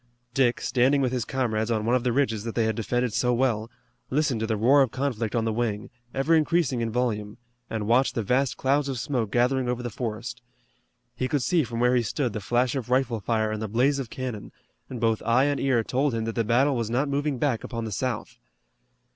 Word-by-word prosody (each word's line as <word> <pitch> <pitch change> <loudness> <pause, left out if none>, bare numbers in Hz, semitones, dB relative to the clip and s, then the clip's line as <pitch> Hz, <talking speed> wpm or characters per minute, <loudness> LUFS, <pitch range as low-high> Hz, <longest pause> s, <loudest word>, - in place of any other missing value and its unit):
Dick, 125 -2 +2
standing 130 +3 +2
with 130 -3 +1
his 125 -3 -1
comrades 115 -4 -1
on 110 -2 0
one 120 - +2
of 125 - 0
the 125 - +1
ridges 115 -5 0
that 115 -1 -5
they 115 - +2
had 110 -1 0
defended 120 +1 -1
so 125 +3 +1
well, 115 -3 0 0.4
listened 140 -4 +1
to 110 - -1
the 110 -1 0
roar 130 +7 +5
of 135 - +3
conflict 120 -4 -2
on 115 -1 +1
the 110 - 0
wing, 110 -2 -2 0.2
ever 135 +6 +1
increasing 160 -5 +2
in 115 - -1
volume, 110 -3 -2 0.3
and 110 -2 -3
watched 125 +5 +2
the 115 - 0
vast 125 +5 +1
clouds 140 +1 +1
of 135 - -3
smoke 120 -3 -1
gathering 125 +1 +2
over 125 0 -2
the 120 - -4
forest. 115 0 -5 0.7
He 130 +2 -1
could 140 -1 0
see 170 +1 +2
from 115 -1 -5
where 125 +1 +3
he 125 - +3
stood 120 +1 -2
the 105 - -4
flash 120 +4 +1
of 130 -4 -4
rifle 125 -3 +1
fire 110 +1 0
and 110 0 -3
the 110 - -2
blaze 130 +7 +2
of 130 -4 -4
cannon, 125 -5 -5 0.4
and 125 - -6
both 115 -1 +1
eye 120 +3 +3
and 145 -1 0
ear 130 -4 +2
told 130 +2 0
him 110 -1 -2
that 115 - -3
the 115 - 0
battle 130 +6 +2
was 115 -3 -2
not 130 +5 +1
moving 140 0 -1
back 125 -3 0
upon 115 -2 -4
the 110 - -5
South. 120 +1 -3
120 Hz, 230 wpm, -26 LUFS, 115-135 Hz, 0.7 s, roar